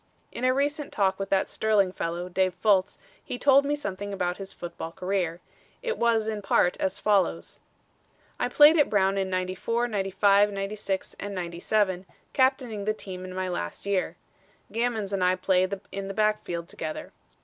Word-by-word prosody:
In - - -6
a 255 - +4
recent 285 +2 -1
talk 195 -2 +1
with 195 - -3
that 195 -1 +2
sterling 210 -4 +2
fellow, 175 0 -3
Dave 185 0 0
Fultz, 190 0 +2 0.3
he 245 - -5
told 280 +1 +5
me 290 +1 +1
something 205 -7 -5
about 180 -2 -2
his 195 -1 -8
football 170 -1 -7
career. 180 -2 -2 0.4
It 465 - -1
was, 230 -2 +2
in 215 -1 -2
part, 185 -2 +2
as 190 +1 -1
follows: 190 - +1 0.8
"I - - 0
played 300 +5 +7
at 295 - +4
Brown 195 -2 +2
in 190 -1 -1
'94, 185 +6 -1
'95, 200 -1 +3
'96 195 -1 -3
and 200 0 -5
'97, 185 +2 -1 0.3
captaining 260 -6 +1
the 215 0 0
team 185 -3 -7
in 185 0 -7
my 185 0 -2
last 85 - -4
year. 190 -4 0 0.6
Gammons 225 -3 -1
and 190 -2 0
I 180 0 +4
played 185 +1 +1
in 195 0 -4
the 195 - -6
backfield 210 -6 0
together. 155 -2 -6
195 Hz, 170 wpm, -27 LUFS, 185-215 Hz, 0.8 s, played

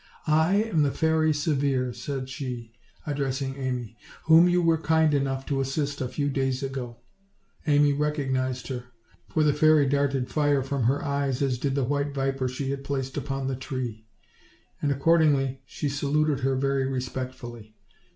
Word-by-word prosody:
"I 160 +4 +3
am 185 -9 0
the 145 - +3
Fairy 160 +1 +2
Severe," 140 -4 0
said 135 -1 -4
she, 125 -4 -6 0.3
addressing 135 -2 -2
Amy, 125 -4 -4 0.3
"whom 165 +2 +7
you 175 0 +3
were 165 -2 +2
kind 160 -1 +3
enough 135 -1 0
to 135 -2 0
assist 140 +1 -2
a 130 - -1
few 145 +3 -2
days 135 -1 -1
ago." 130 -3 -5 0.7
Amy 145 -1 +4
recognized 135 -4 -1
her, 125 -2 -4 0.4
for 155 - +1
the 150 -1 +4
fairy 155 0 +5
darted 140 -2 +1
fire 145 -3 +1
from 135 -2 -1
her 135 +4 +1
eyes, 140 -1 0
as 130 -3 0
did 135 0 -1
the 140 - +1
white 140 +2 -1
viper 135 -1 0
she 135 +2 -3
had 140 0 -4
placed 135 -2 -3
upon 135 -1 -3
the 135 0 -1
tree; 125 -5 -5 0.7
and, 145 - +1
accord 160 +5 +3
ingly, 135 -3 +2
she 150 - -3
saluted 145 +1 +1
her 135 0 +1
very 135 0 +1
respectfully. 125 -4 -5
135 Hz, 165 wpm, -26 LUFS, 130-145 Hz, 0.7 s, whom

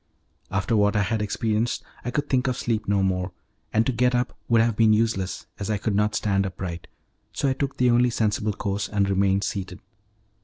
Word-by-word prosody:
After 100 +3 0
what 105 0 +3
I 105 - +3
had 110 +1 -1
experienced, 110 +2 -1 0.2
I 120 - -3
could 145 +4 -1
think 130 -1 +1
of 125 - 0
sleep 110 -3 -1
no 100 -1 +2
more, 90 -1 -1 0.4
and 110 +1 +2
to - - +1
get 125 +1 +2
up 120 0 -1
would 115 -1 +5
have 115 -1 +2
been 110 0 +5
useless 105 -4 0
as 100 - -4
I 105 - +1
could 105 +1 -1
not 105 +1 +1
stand 100 -2 +1
upright, 90 -2 -5 0.5
so - - 0
I 135 - +2
took 135 0 -3
the 125 -1 +4
only 120 +1 +4
sensible 105 -2 0
course 100 0 -2
and 100 -2 +1
remained 100 0 +2
seated. 95 -2 -4
105 Hz, 205 wpm, -25 LUFS, 100-115 Hz, 0.5 s, would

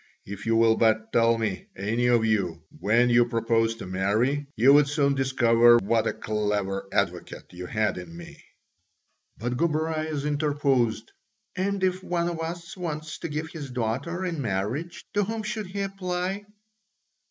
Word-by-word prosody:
If 100 +2 -7
you 115 - +3
will 115 0 +4
but 110 0 +2
tell 115 0 +4
me, 110 -4 -3
any 115 +5 0
of 120 -2 +3
you, 95 -7 0 0.2
when 120 +4 +3
you 120 0 +6
propose 115 -1 +1
to 115 - -8
marry, 110 +10 0
you 130 +5 +6
would 145 0 +6
soon 140 -1 +2
discover 120 -3 +5
what 115 +1 +1
a - - 0
clever 105 -2 -2
advocate - - -2
you 90 0 -7
had 105 -3 0
in 85 -2 -10
me." 85 - -12 0.9
But 120 +2 -3
Gobryas 155 -1 -1
interposed, 145 -6 0 0.4
"And 195 +1 -1
if 185 0 0
one 175 -1 -1
of 170 -2 -5
us 170 +1 -5
wants 155 -4 -5
to - - -5
give 150 +2 -4
his 150 -5 -7
daughter 130 +10 -2
in 165 -5 -3
marriage, 115 - -3
to 205 -1 +2
whom 220 +2 -3
should 215 -2 -4
he 200 +2 -4
apply?" 190 +1 -3
125 Hz, 160 wpm, -26 LUFS, 110-165 Hz, 0.9 s, you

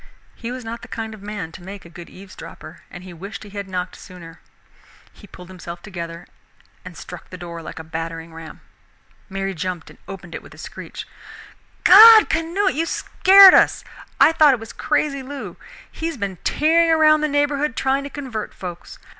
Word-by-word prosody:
He 235 0 -7
was 250 -1 -7
not 230 +1 -7
the - - -11
kind 220 -1 -6
of 215 - -12
man 205 -5 -6
to 175 - -12
make 195 +1 -10
a - - -11
good 170 0 -12
eavesdropper, 185 -4 -12
and 180 - -11
he 185 -1 -11
wished 200 +5 -9
he 205 - -13
had 200 -1 -6
knocked 180 -1 -5
sooner. 170 -3 -13 0.7
He 205 - -16
pulled 180 -2 -13
himself 175 -1 -10
together 170 -3 -8 0.6
and 180 -3 -11
struck 180 +3 -11
the 185 - -9
door 170 -1 -8
like - - -10
a 160 - -7
battering 165 +1 -7
ram. 165 -1 -11 0.7
Mary 195 0 -4
jumped 180 -1 -5
and - - -19
opened 180 -3 -10
it - - -6
with - - -15
a - - -19
screech. - - -9 0.8
"God! 435 +3 +9
Canute, 330 +3 -2
how 405 -1 +2
you 330 -1 -2
scared 385 +2 +6
us! - - +3 0.4
I - - +7
thought 305 -4 +5
it - - -10
was 225 0 -10
crazy 275 -2 -1
Lou 260 -9 -8 0.4
he 325 - -5
has 330 -4 -5
been 200 -4 -4
tearing 330 - +2
around 310 -1 +4
the 305 - +1
neighborhood 290 -1 0
trying 270 +1 0
to 280 - -7
convert 260 -7 -7
folks. 175 -2 -9
200 Hz, 195 wpm, -21 LUFS, 175-285 Hz, 0.8 s, God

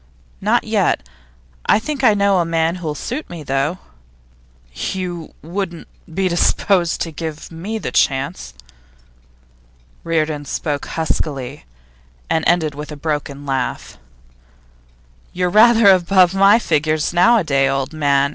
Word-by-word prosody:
'Not - - +2
yet. - - 0 0.6
I - - +5
think 275 +6 -4
I 220 -4 +5
know 200 -2 +3
a - - +3
man 165 +1 0
who'll 160 -4 -4
suit 260 - -5
me, 170 -3 -8
though.' 135 +5 -1 1.0
'You 175 - -4
wouldn't 175 0 -5 0.2
be 190 +3 0
disposed 175 0 +1
to 165 - -2
give 160 0 -7
me 190 +7 -5
the - - -5
chance?' 135 - 0 1.5
Reardon 155 -3 -1
spoke 145 0 -3
huskily, 145 -4 -3 0.7
and 160 - +1
ended 165 -3 +2
with 150 +2 -8
a - - -6
broken 145 -2 -4
laugh. 135 -2 -3 1.3
'You're 180 0 0
rather 220 0 +6
above 185 0 +4
my 195 +2 +6
figure 155 -7 0 0.2
nowadays, 175 - +3
old 135 +2 -2
man! 140 -2 +2
165 Hz, 125 wpm, -19 LUFS, 150-185 Hz, 1.5 s, rather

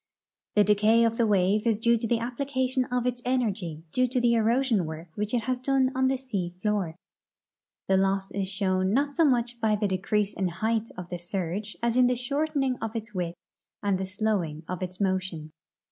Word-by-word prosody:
The 210 - +6
decay 210 +3 +4
of 230 0 0
the 230 - +3
wave 205 +2 +2
is 225 -2 +3
due 235 +2 +3
to 230 0 -2
the 235 - +2
application 260 +2 -1
of 245 0 -1
its 245 -1 -1
energy 205 -11 -1
to 255 0 +2
the 245 -1 +2
erosion 230 -4 +2
work 160 +2 -7
Avhich 210 +3 -1
it 235 - 0
has 255 +1 -1
done 265 0 +2
on 260 0 +2
the 265 0 +1
sea 200 -10 -4
door. 205 -6 0 0.4
* - - -66
The 190 - +4
loss 195 0 +1
is 195 -1 -2
shown 190 -1 0
not 285 +1 +1
so 330 - +3
much 240 -3 +1
by 215 -1 +3
the 210 0 0
decrease 195 +2 0
in 190 - -2
the - - -4
height 220 +3 -1
of 180 -1 -7
the 175 - -4
surge 185 +3 -4
as 235 +1 +1
in 250 -1 +6
the 250 - +2
shortening 275 +1 -1
of 225 +1 -4
its 220 -1 -5
width 175 -2 -3 0.5
and 200 -2 +1
the 190 - -3
slowing 190 -6 -1
of 180 0 -4
its 185 0 -5
motion. 185 -5 -1
215 Hz, 205 wpm, -27 LUFS, 190-245 Hz, 0.5 s, The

